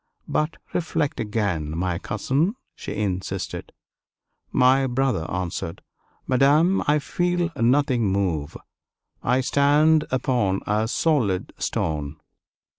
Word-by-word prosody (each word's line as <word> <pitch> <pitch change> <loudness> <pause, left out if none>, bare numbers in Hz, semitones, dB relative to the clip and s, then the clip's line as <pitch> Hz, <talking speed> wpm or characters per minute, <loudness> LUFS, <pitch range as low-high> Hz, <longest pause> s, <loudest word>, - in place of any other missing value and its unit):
"But 155 +1 -1 0.2
reflect 160 -3 -1
again, 95 -8 -2
my 90 -1 -1
cousin," 160 - 0 0.2
she - - -7
insisted. 95 -3 -3 0.8
My 130 +1 +4
brother 125 -9 0
answered, 85 -2 -4 0.4
"Madame, 145 +8 +4
I 150 +1 +4
feel 175 +3 -1
nothing 125 -1 +2
move. 85 -7 -1 0.6
I 130 +1 +2
stand 150 +4 +3
upon 120 -7 +1
a 105 +2 +1
solid 115 - 0
stone." 75 -1 -2
125 Hz, 100 wpm, -24 LUFS, 95-145 Hz, 0.8 s, My